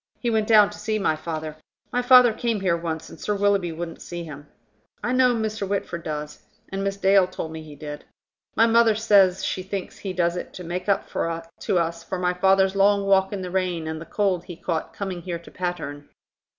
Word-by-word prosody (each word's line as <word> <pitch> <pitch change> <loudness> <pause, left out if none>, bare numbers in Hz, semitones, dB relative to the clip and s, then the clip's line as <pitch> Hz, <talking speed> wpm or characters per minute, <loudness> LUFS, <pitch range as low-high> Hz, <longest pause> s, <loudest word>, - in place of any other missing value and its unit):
He 240 - -1
went 220 -1 +1
down 210 -2 +6
to 210 - -11
see 215 +1 -1
my 175 -6 +1
father. 155 -1 -5 0.4
My 245 - +2
father 250 -2 +7
came 225 -2 -1
here 180 -3 +2
once, 165 -1 -4
and - - -12
Sir 210 - -1
Willoughby 200 -3 +2
wouldn't 165 0 -6
see 175 -1 -6
him. 145 -2 -10 0.6
I 250 - 0
know 255 -1 +4
Mr. 220 -2 -2
Whitford 195 -4 -2
does. 150 -1 -5 0.3
And 195 +1 -3
Miss 195 0 -2
Dale 195 -1 +4
told 170 -3 -6
me 160 0 -7
he 155 -2 -11
did. 145 0 -8 0.5
My 225 - +5
mother 230 -1 +4
says 200 -4 +4
she 185 - -2
thinks 190 0 -6
he 195 - -4
does 170 -1 +1
it 180 - -6
to 180 - -7
make 180 +3 -4
up 200 - +1 0.5
to - - 0
us 170 0 -1
for 190 - -4
my 180 0 +1
father's 190 +1 +3
long 200 0 +3
walk 190 -1 +3
in 195 -2 -4
the 180 - -5
rain 180 -3 -1
and 160 0 -4
the - - -7
cold 190 -4 0
he 175 - -8
caught 165 -1 -3
coming 190 -3 -5
here 170 0 -4
to 170 - -15
Patterne." 160 -6 -5
185 Hz, 215 wpm, -24 LUFS, 170-205 Hz, 0.6 s, father